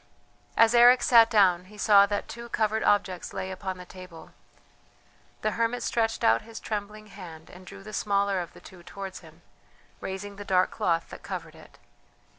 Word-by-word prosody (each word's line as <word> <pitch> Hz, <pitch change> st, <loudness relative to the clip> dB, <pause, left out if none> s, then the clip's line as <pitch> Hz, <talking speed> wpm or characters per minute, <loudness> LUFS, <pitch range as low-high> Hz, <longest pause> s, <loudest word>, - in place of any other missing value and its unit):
As 230 Hz, 0 st, +5 dB
Eric 240 Hz, +1 st, +6 dB
sat 230 Hz, -2 st, +6 dB
down 185 Hz, -5 st, +3 dB
he 210 Hz, +3 st, -16 dB
saw 200 Hz, -1 st, +5 dB
that 205 Hz, 0 st, -3 dB
two 235 Hz, 0 st, -9 dB
covered 220 Hz, -1 st, 0 dB
objects 195 Hz, -3 st, 0 dB
lay 190 Hz, -, -4 dB
upon 190 Hz, 0 st, -5 dB
the 180 Hz, -, -10 dB
table. 180 Hz, -2 st, -12 dB, 1.1 s
The 215 Hz, -, +1 dB
hermit 230 Hz, +2 st, -1 dB
stretched 225 Hz, -1 st, -1 dB
out 115 Hz, +1 st, +4 dB
his 225 Hz, 0 st, -10 dB
trembling 210 Hz, 0 st, -5 dB
hand 175 Hz, -6 st, -12 dB
and 180 Hz, 0 st, -14 dB
drew 195 Hz, +1 st, -11 dB
the 215 Hz, +1 st, -10 dB
smaller 200 Hz, -2 st, 0 dB
of 175 Hz, -1 st, -6 dB
the -, -, -15 dB
two 185 Hz, -2 st, -14 dB
towards 190 Hz, +2 st, -8 dB
him, 165 Hz, 0 st, -18 dB, 0.6 s
raising 200 Hz, +1 st, -6 dB
the 205 Hz, -, -7 dB
dark 185 Hz, -2 st, +2 dB
cloth 165 Hz, -1 st, -1 dB
that -, -, -10 dB
covered -, -, -7 dB
it. -, -, -17 dB
200 Hz, 180 wpm, -27 LUFS, 185-215 Hz, 1.1 s, Eric